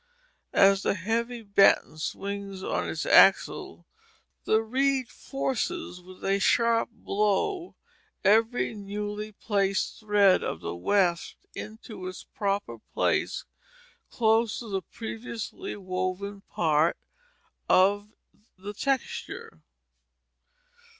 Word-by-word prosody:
As 195 0 +6
the - - +1
heavy 230 +5 -2
batten 200 -6 +4
swings 200 +2 -5
on - - -1
its - - -3
axle, - - +4 0.6
the 220 +1 +3
reed 260 +2 +1
forces 270 - -3
with 185 +1 -12
a 195 +1 +2
sharp 230 +3 +3
blow 225 - -1 0.5
every 225 +5 +3
newly 210 +1 -5
placed 195 -2 -1
thread 205 -3 +4
of - - -3
the - - -5
weft 170 - +1 0.2
into 215 -3 -8
its 185 - -7
proper 200 - -3 0.2
place - - 0 0.6
close 225 -1 +2
to 230 - -7
the 195 -1 -1
previously 230 - -6
woven 185 +1 -4
part 160 0 +2 0.7
of 205 +3 +4 0.5
the 200 +2 -7
texture. 275 - -3
205 Hz, 100 wpm, -27 LUFS, 195-230 Hz, 0.7 s, As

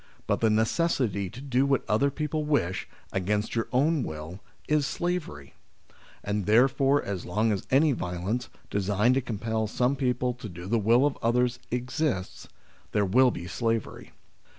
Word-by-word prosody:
But - - 0
the 115 - +4
necessity 110 - +1
to 120 - -10
do 135 -1 +1
what 135 -3 +1
other 125 +7 +2
people 150 +2 -2
wish, 140 - 0 0.2
against 105 +3 -1
your 115 -1 -1
own 145 +4 +2
will, 80 0 -6 0.3
is 150 -2 +2
slavery. 165 - -3 0.7
And 105 -1 -2
therefore 135 +5 +4
as 95 -3 -4
long 110 +5 0
as 100 - -3
any 145 +3 +4
violence, 100 +2 -3 0.2
designed 100 +4 +2
to 135 - +2
compel 110 -1 -2
some 125 +5 +1
people 125 -2 0
to 120 -3 -9
do 90 0 -9
the 115 +4 +1
will 115 +6 +4
of 145 - -1
others, 125 +1 +1
exists, 125 -4 -2 0.5
there 105 -1 +2
will 125 +7 +5
be 85 -7 -5
slavery. 115 +3 -2
115 Hz, 155 wpm, -27 LUFS, 100-135 Hz, 0.7 s, will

